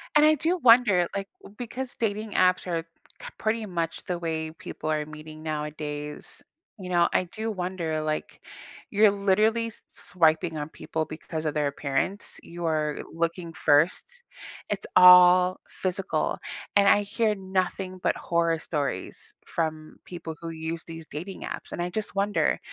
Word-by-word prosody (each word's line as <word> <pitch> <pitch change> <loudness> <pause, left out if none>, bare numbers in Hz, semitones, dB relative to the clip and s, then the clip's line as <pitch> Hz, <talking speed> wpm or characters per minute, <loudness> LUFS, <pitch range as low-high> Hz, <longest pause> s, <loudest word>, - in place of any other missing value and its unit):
And 300 0 +7
I 310 0 +6
do 335 +5 0
wonder, 230 - +5
like, 195 0 -3 0.3
because 250 +2 -5
dating 215 -1 -1
apps 185 0 +3
are 165 -2 -1 0.4
c - - -7
pretty 220 0 -1
much 170 -4 -3
the 180 -3 -2
way 160 -1 -3
people 155 -1 -7
are 150 -1 0
meeting 155 0 -10
nowadays. 150 -1 -5 0.4
You 185 - -7
know, 175 -1 +4
I 185 - +2
do 220 +5 -4
wonder, 175 -5 -2
like, 155 0 -3 0.5
you're 210 0 +5
literally 210 +4 +2
s 225 - -11
swiping 160 -2 +1
on 150 +1 -4
people 160 0 -4
because 155 0 -6
of 150 - 0
their 150 -1 +1
appearance, 140 +7 -2
you 170 0 -7
are 155 -2 0
looking 170 +1 -2
first. 155 +2 +3 0.6
It's 205 -1 -2
all 180 0 +8
physical. 190 +1 -2 0.4
And 200 -1 +5
I 205 - +5
hear 215 +1 0
nothing 185 -1 -2
but - - +2
horror 170 -1 +1
stories 145 -5 -4
from 155 -1 -3
people 170 -3 -7
who 165 - -5
use 160 0 -5
these 165 -1 -9
dating 180 +6 -7
apps, - - -6
and 175 - -4
I 175 - -1
just 215 +2 -4
wonder, 200 +1 +1
175 Hz, 155 wpm, -26 LUFS, 160-200 Hz, 0.6 s, all